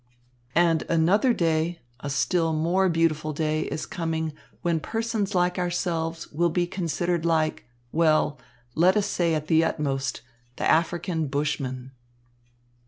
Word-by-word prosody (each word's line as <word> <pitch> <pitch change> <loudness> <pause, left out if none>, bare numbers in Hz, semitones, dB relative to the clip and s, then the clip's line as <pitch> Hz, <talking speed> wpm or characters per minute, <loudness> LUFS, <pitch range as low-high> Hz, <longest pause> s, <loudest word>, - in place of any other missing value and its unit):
"And 165 -1 +4
another 180 +10 +3
day, 165 -3 0 0.2
a 145 - -5
still 165 +4 +1
more 175 +5 +2
beautiful 155 -2 +1
day, 155 +1 0
is 155 - -4
coming 160 -5 -3 0.3
when 170 -2 +1
persons 225 0 -2
like 180 0 +2
ourselves 170 -2 -2
will 170 +3 +1
be 175 +2 +1
considered 175 -1 -1
like, 160 -2 +1 0.3
well, 155 -3 +2 0.3
let 180 +7 +4
us 205 - +2
say 175 -5 +1
at 155 -1 -2
the 160 0 +4
utmost, 135 -4 -1 0.3
the - - -1
African 165 0 +1
Bushmen." 135 -2 -2
165 Hz, 130 wpm, -25 LUFS, 155-175 Hz, 0.3 s, And